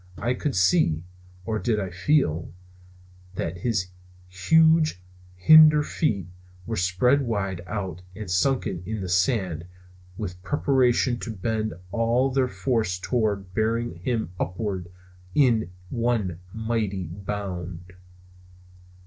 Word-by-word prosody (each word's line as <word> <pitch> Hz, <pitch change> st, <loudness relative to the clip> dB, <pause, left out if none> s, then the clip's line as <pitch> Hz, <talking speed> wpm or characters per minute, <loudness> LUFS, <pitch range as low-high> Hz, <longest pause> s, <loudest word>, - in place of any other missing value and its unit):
I 120 Hz, -, 0 dB
could 140 Hz, +3 st, -2 dB
see 95 Hz, -, +3 dB, 0.4 s
or 110 Hz, +1 st, -1 dB
did 110 Hz, -2 st, 0 dB
I 95 Hz, -3 st, -3 dB
feel 90 Hz, -, +1 dB, 0.8 s
that 85 Hz, 0 st, -3 dB
his 100 Hz, -4 st, -1 dB, 0.4 s
huge 160 Hz, -, +3 dB, 0.4 s
hinder 155 Hz, +8 st, +7 dB
feet 105 Hz, -, -1 dB, 0.4 s
were 115 Hz, -, -3 dB
spread 95 Hz, +10 st, +2 dB
wide 100 Hz, -7 st, -2 dB
out 95 Hz, -5 st, -4 dB
and 105 Hz, 0 st, -7 dB
sunken 95 Hz, 0 st, 0 dB
in 110 Hz, -1 st, -3 dB
the 95 Hz, -, -4 dB
sand 90 Hz, -, 0 dB, 0.5 s
with 90 Hz, -5 st, -6 dB
preparation 125 Hz, +1 st, +2 dB
to 115 Hz, -, -5 dB
bend 110 Hz, 0 st, -2 dB, 0.2 s
all 120 Hz, +5 st, +2 dB
their 130 Hz, -1 st, +2 dB
force 100 Hz, -2 st, -1 dB
toward 100 Hz, -2 st, -1 dB
bearing 115 Hz, +1 st, 0 dB
him 110 Hz, 0 st, -2 dB
upward 95 Hz, -2 st, -3 dB, 0.5 s
in 115 Hz, -9 st, +3 dB, 0.2 s
one 115 Hz, -8 st, -1 dB
mighty 110 Hz, -3 st, -2 dB
bound. 95 Hz, -1 st, -6 dB
105 Hz, 115 wpm, -25 LUFS, 90-120 Hz, 0.8 s, hinder